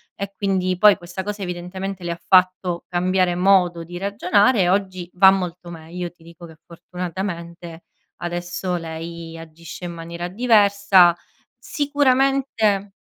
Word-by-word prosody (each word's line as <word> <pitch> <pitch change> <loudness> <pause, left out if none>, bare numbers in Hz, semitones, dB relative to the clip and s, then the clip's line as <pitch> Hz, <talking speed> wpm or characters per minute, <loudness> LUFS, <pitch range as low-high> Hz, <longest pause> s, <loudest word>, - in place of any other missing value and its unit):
e 200 0 -6
quindi 185 -2 -1
poi 210 0 +6
questa 175 +2 -7
cosa 205 0 -5
evidentemente 180 +2 -6
le 175 - -3
ha 170 - -6
fatto 185 -1 +2
cambiare 180 0 +1
modo 180 -2 +3
di 175 +1 -8
ragionare 205 +2 +2
e 175 - +1
oggi 185 -2 -1
va 190 +1 +7
molto 180 -2 -4
meglio. 170 +2 -7
Ti 175 -2 -24
dico 170 +1 -13
che 160 -1 -16
fortunatamente 170 -1 -7 0.4
adesso 175 +1 -4
lei 165 0 -7
agisce 165 +2 -10
in 175 - -5
maniera 170 +1 -6
diversa. 200 -4 +4 0.4
Sicuramente 270 - 0
180 Hz, 135 wpm, -21 LUFS, 170-195 Hz, 0.4 s, va